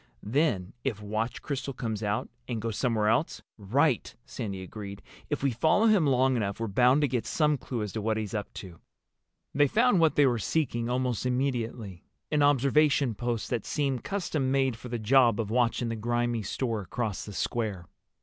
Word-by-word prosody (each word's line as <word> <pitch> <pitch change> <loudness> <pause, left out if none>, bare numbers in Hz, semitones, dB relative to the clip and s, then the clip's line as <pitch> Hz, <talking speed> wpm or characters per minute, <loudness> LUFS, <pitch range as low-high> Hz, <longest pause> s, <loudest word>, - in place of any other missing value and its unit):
Then 110 - 0
if 120 -7 -2
Watch 110 +3 -3
Crystal 140 -1 -4
comes 110 -4 -3
out 105 0 -1 0.2
and 120 -3 -3
goes 110 0 -3
somewhere 110 -4 +1
else—" 120 +9 +1 0.2
"Right," 125 +6 +1
Sandy 100 -6 -5
agreed. 100 +1 -8 0.3
"If 145 -2 -2
we 140 - +2
follow 160 - +3
him 205 -9 +4
long 130 0 +3
enough 100 -3 -2
we're 115 -1 -2
bound 125 +7 +4
to 145 - +3
get 125 -3 -2
some 150 -1 +2
clue 120 -4 -4
as 105 - -4
to 110 - -3
what 110 +1 0
he's 105 -3 -4
up 105 -2 -3
to." 90 -4 -9 0.7
They 145 +1 +4
found 230 - +3
what 160 -2 +3
they 145 - +5
were 120 -3 +2
seeking 120 0 -1
almost 125 -2 -1
immediately—an 125 - -3
observation 145 -1 +3
post 120 +2 -3
that 120 -4 -1
seemed 135 -4 -1
custom 170 -9 -1
made 135 -2 +1
for 125 +2 -10
the 120 - -2
job 115 0 +4
of 110 -2 -2
watching 120 0 +1
the 115 - -2
grimy 120 +1 -1
store 115 +2 -2
across 105 +1 -3
the 105 - -8
square. 105 -5 -2
120 Hz, 185 wpm, -28 LUFS, 110-135 Hz, 0.7 s, they